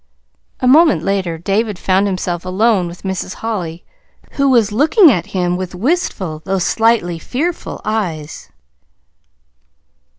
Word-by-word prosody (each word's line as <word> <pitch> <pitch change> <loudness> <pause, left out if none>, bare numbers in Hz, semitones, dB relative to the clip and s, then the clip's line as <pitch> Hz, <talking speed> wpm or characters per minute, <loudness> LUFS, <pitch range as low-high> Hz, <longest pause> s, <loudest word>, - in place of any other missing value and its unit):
A 255 - +1
moment 310 +4 +5
later 190 -4 -1
David 200 +4 -1
found 190 +2 +1
himself 180 -3 -3
alone 190 0 +1
with 170 +1 -10
Mrs. 190 -1 -4
Holly, 180 -7 -5 0.5
who 275 -1 +1
was 230 -5 +3
looking 305 - +5
at 180 -7 -1
him 180 -1 -1
with 185 -1 -5
wistful, 190 - -2
though 195 +4 -1
slightly 190 -3 +1
fearful 320 - -4
eyes. 170 -9 -4
195 Hz, 125 wpm, -17 LUFS, 175-235 Hz, 0.5 s, moment